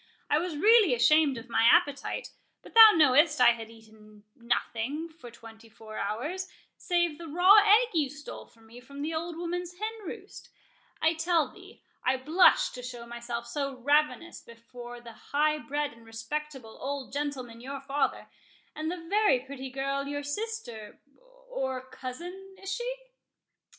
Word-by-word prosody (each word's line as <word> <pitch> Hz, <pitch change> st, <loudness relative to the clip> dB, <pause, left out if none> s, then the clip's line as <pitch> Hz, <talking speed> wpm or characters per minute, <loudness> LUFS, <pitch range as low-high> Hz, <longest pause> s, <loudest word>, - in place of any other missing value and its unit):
I 295 Hz, -, +4 dB
was 340 Hz, -3 st, -4 dB
really 425 Hz, -, +5 dB
ashamed 285 Hz, +2 st, +4 dB
of 230 Hz, +2 st, -9 dB
my 235 Hz, -, +1 dB
appetite; 285 Hz, -, +1 dB, 0.3 s
but -, -, -14 dB
thou 450 Hz, -1 st, +11 dB
knowest 295 Hz, 0 st, +4 dB
I 245 Hz, -1 st, +7 dB
had 225 Hz, -1 st, -6 dB
eat 225 Hz, -1 st, -17 dB, 0.4 s
nothing 245 Hz, +6 st, -2 dB
for 315 Hz, -7 st, -13 dB
twenty 225 Hz, -1 st, -15 dB
four 220 Hz, 0 st, -10 dB
hours, 295 Hz, -, -3 dB, 0.3 s
save 345 Hz, -4 st, 0 dB
the 335 Hz, -, -8 dB
raw 355 Hz, +7 st, +6 dB
egg 425 Hz, +4 st, +5 dB
you 305 Hz, -5 st, +1 dB
stole 290 Hz, +1 st, -10 dB
for 230 Hz, -, -25 dB
me 225 Hz, +2 st, -14 dB
from 280 Hz, +3 st, -9 dB
the 320 Hz, +2 st, -3 dB
old 330 Hz, +1 st, -4 dB
woman's 350 Hz, +1 st, -4 dB
hen 430 Hz, +3 st, -3 dB
roost—I 320 Hz, -2 st, -6 dB
tell 330 Hz, -1 st, +1 dB
thee, 390 Hz, +2 st, -16 dB, 0.2 s
I 260 Hz, +1 st, +2 dB
blushed 310 Hz, +8 st, +4 dB
to 250 Hz, -, -7 dB
show 245 Hz, -1 st, -8 dB
myself 235 Hz, 0 st, -6 dB
so 275 Hz, +2 st, -3 dB
ravenous 295 Hz, +6 st, 0 dB
before 240 Hz, +1 st, -11 dB
that 235 Hz, -1 st, -13 dB
high 305 Hz, +1 st, +2 dB
bred 295 Hz, -1 st, -3 dB
and 230 Hz, 0 st, -18 dB
respectable 250 Hz, +1 st, -6 dB
old 275 Hz, -1 st, -5 dB
gentleman 265 Hz, -5 st, -4 dB
your 275 Hz, +2 st, -6 dB
father, 275 Hz, +1 st, -2 dB, 0.5 s
and 310 Hz, +1 st, -3 dB
the 345 Hz, -1 st, -6 dB
very 410 Hz, -, +3 dB
pretty 265 Hz, 0 st, -8 dB
girl 275 Hz, +1 st, -3 dB
your 290 Hz, 0 st, -4 dB
sister—or 290 Hz, -, -6 dB
cousin, 355 Hz, +9 st, -8 dB
is 390 Hz, 0 st, -4 dB
she?" -, -, -4 dB
285 Hz, 155 wpm, -28 LUFS, 245-340 Hz, 0.5 s, thou